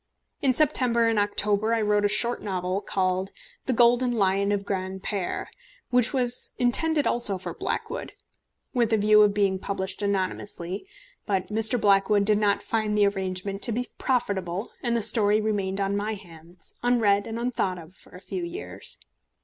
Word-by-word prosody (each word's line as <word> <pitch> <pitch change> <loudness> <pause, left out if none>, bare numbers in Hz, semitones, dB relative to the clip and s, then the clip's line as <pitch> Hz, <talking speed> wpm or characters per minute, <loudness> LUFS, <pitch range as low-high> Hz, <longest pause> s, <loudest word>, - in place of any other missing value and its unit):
In 270 - +3
September 245 -6 +2
and 225 -2 +2
October 205 +2 +1
I 225 - 0
wrote 210 0 +2
a - - +5
short 235 +4 0
novel, 185 -1 -2
called 185 0 -1 0.4
The 260 - +1
Golden 245 +1 +4
Lion 200 -2 +1
of 200 -1 0
Granpère, 190 0 -3 0.5
which 250 -1 +3
was 250 -2 +2
intended 290 +5 +3
also 225 -5 +3
for 185 - -6
Blackwood, - - -4 0.6
with 235 -3 +1
a 220 - +4
view 210 0 +5
of 205 -1 +4
being 195 -2 +1
published 190 +1 -4
anonymously; 195 - -3 0.4
but 190 -3 -1
Mr. 225 +3 0
Blackwood 200 0 +3
did 210 0 +3
not 205 -1 +1
find 215 -2 -1
the 205 - +5
arrangement 195 0 -2
to 235 - +2
be 245 +2 -3
profitable, 200 -7 -1
and 235 -1 0
the 225 - +1
story 210 -1 +3
remained 200 -3 -1
on 195 0 0
my 210 +2 -2
hands, 170 -3 -14
unread 220 -5 +2
and 225 0 -5
unthought 235 -6 -1
of, 170 +1 -12
for 190 - -19
a - - -9
few 350 - -5
years. 425 +7 -7
205 Hz, 165 wpm, -26 LUFS, 195-235 Hz, 0.6 s, a